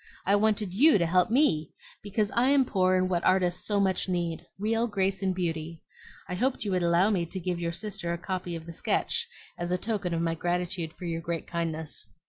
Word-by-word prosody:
I 200 - +4
wanted 210 -2 +1
YOU 280 +6 +6
to 175 - +1
help 180 +1 +3
ME, 220 - +3 0.3
because 205 +1 -1
I 250 +3 +3
am 275 -2 +4
poor 185 -4 +2
in 185 0 +2
what 175 -2 0
artists 180 -1 +2
so 205 -1 +1
much 190 -1 +1
need, 170 -2 -2
real 225 +4 +1
grace 195 -2 0
and 190 -1 0
beauty. 165 -2 -3 0.4
I - - -4
hoped 250 +3 0
you 200 - -1
would 185 -1 +1
allow 175 +4 +3
me 185 -5 +1
to 190 - -5
give 180 -1 -2
your 170 -1 -1
sister 175 -2 -4
a 170 - -1
copy 180 -1 -4
of 165 -1 -7
the 170 - -8
sketch 465 - 0 0.3
as 175 0 -3
a 180 - +2
token 200 -3 -2
of 165 - -1
my 165 -1 +1
gratitude 175 0 -2
for 180 - -10
your 165 -1 -2
great 165 -1 -3
kindness." 160 -2 -4
180 Hz, 220 wpm, -28 LUFS, 170-205 Hz, 0.4 s, YOU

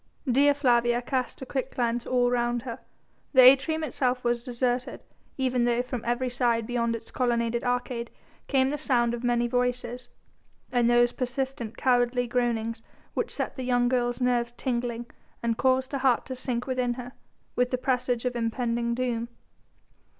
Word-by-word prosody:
Dea 275 +2 +4
Flavia 240 -4 +2
cast 255 +1 -3
a - - -6
quick 265 0 -4
glance 240 -1 -1
all 245 -1 +2
round 240 -1 0
her. 245 -1 -6 0.5
The 260 - +8
atrium 275 +5 +6
itself 255 -4 -1
was 240 0 0
deserted, 250 0 -2 0.4
even 255 -2 +1
though 240 0 +1
from 250 -2 -5
every 240 +2 0
side 240 -2 +1
beyond 235 -1 0
its 225 0 -10
colonnaded 235 -2 0
arcade 245 -1 -2 0.4
came 265 -1 +2
the 295 - -3
sound 240 -3 +2
of 240 +1 -5
many 240 -1 +2
voices 245 0 -2 0.6
and 240 -1 +3
those 240 0 +4
persistent, 255 -2 -3
cowardly 245 -1 +2
groanings 230 -2 -1 0.3
which - - -1
set - - -3
the 260 - -3
young 245 -1 +2
girl's 245 -1 0
nerves 240 -1 0
tingling 240 -2 -2 0.4
and 230 0 0
caused 260 0 +2
her 275 - -2
heart 260 -2 +2
to 260 - -5
sink 250 -1 -3
within 255 -2 -1
her, 250 0 -7 0.4
with 250 0 +2
the 255 - 0
presage 250 -1 0
of 250 -1 -1
impending 235 0 -1
doom. 235 -2 -2
245 Hz, 165 wpm, -27 LUFS, 240-255 Hz, 0.6 s, The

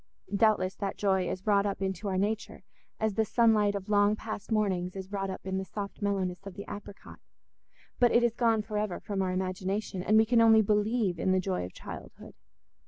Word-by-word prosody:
Doubtless 200 -3 +3
that 200 -1 -3
joy 190 -3 +1
is 185 - -5
wrought 205 -1 +3
up 200 - -3
into 190 +1 -3
our 190 -1 -1
nature, 210 +3 -2 0.4
as 220 -1 0
the 220 - +2
sunlight 215 -2 +3
of 195 0 -5
long 205 0 +3
past 215 0 -7
mornings 190 -4 0
is 190 0 -7
wrought 195 -1 -2
up 190 - -7
in 190 0 -2
the - - -3
soft 200 +2 -7
mellowness 195 -2 -2
of 195 - -8
the 200 - -7
apricot, 205 0 -10 0.8
but 245 -1 +5
it 240 - +4
is 240 -2 +2
gone 230 -2 +2
for 210 -1 -3
ever 210 -4 -2
from 200 -2 -3
our 185 -1 0
imagination, 185 +1 -2
and 215 +4 +3
we 220 - +6
can 230 +1 +4
only 225 -1 +6
believe 210 -3 +1
in 185 - +2
the 185 - +3
joy 185 - -2
of 90 - -10
childhood. - - -10
200 Hz, 210 wpm, -29 LUFS, 190-215 Hz, 0.8 s, we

